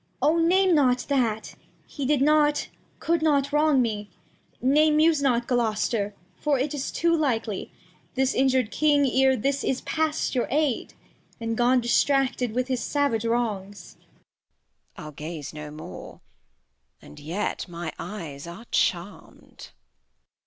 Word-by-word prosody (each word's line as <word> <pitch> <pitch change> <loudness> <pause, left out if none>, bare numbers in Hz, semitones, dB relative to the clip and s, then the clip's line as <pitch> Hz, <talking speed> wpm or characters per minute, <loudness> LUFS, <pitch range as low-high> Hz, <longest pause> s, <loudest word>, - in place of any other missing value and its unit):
Cord. 330 +2 +3
O - - +3
name 370 +2 +4
not 255 -5 +3
that; 235 -6 0 0.3
he 280 -4 -5
did 285 -2 +2
not, 295 0 +3 0.3
cou'd 335 -1 0
not 285 -2 +1
wrong 295 -3 +4
me. 210 -3 -3 0.5
Nay, 295 +5 +4
muse 310 0 +3
not, 245 -4 +1
Gloster, 220 -3 0 0.2
for 295 -2 0
it 275 +3 -1
is 280 -2 -3
too 335 0 +2
hkely 230 -9 -1 0.5
This 265 0 +1
injur'd 260 -4 +2
King 290 -2 +3
e'er 265 0 +3
this, 275 +4 -1
is 260 - -1
past 315 -1 -1
your 250 -3 0
Aid, 290 -2 -1 0.4
And 230 0 -2
gone 245 +2 +3
Distracted 255 0 +1
with 255 0 0
his 255 -3 -1
savage 280 -6 0
Wrongs. 205 -6 -3
Bast. - - -32 1.0
I'll 155 - -9
gaze 150 0 -7
no 150 0 -7
more, 155 +1 -10 0.4
— 65 +1 -49
and 75 - -13
yet 175 +9 -3
my 170 -2 -6
Eyes 160 -7 -7
are 175 +7 -10
charm'd. 180 +3 -3
Cord. - - -32
255 Hz, 145 wpm, -25 LUFS, 210-290 Hz, 1.0 s, name